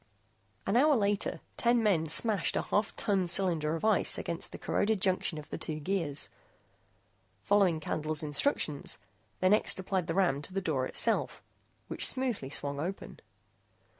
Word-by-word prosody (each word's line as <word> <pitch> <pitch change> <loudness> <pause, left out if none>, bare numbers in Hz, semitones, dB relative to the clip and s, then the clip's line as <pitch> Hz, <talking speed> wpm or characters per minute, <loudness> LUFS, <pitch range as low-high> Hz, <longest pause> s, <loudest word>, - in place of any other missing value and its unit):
An 195 - 0
hour 290 +4 +5
later 205 -3 0 0.2
ten 235 -1 +2
men 175 -7 +2
smashed 200 +3 +3
a - - 0
half 205 +1 -1
ton 195 -5 0
cylinder 170 -4 0
of 165 - -4
ice 215 -3 +4
against 170 - -3
the - - -7
corroded 215 0 0
junction 185 -3 0
of 150 -1 -8
the - - -4
two 155 -1 -4
gears. 155 -3 -1 1.1
Following 195 -5 +3
Candle's 155 0 -2
instructions, 150 - -1 0.4
they 185 - +4
next 210 -1 +4
applied 190 -2 -2
the 165 - -2
ram 175 -8 +2
to 150 - -7
the 195 - 0
door 145 -8 -1
itself, - - 0 0.4
which - - 0
smoothly 245 - -2
swung 140 0 -3
open. 180 +6 -5
185 Hz, 155 wpm, -30 LUFS, 155-205 Hz, 1.1 s, hour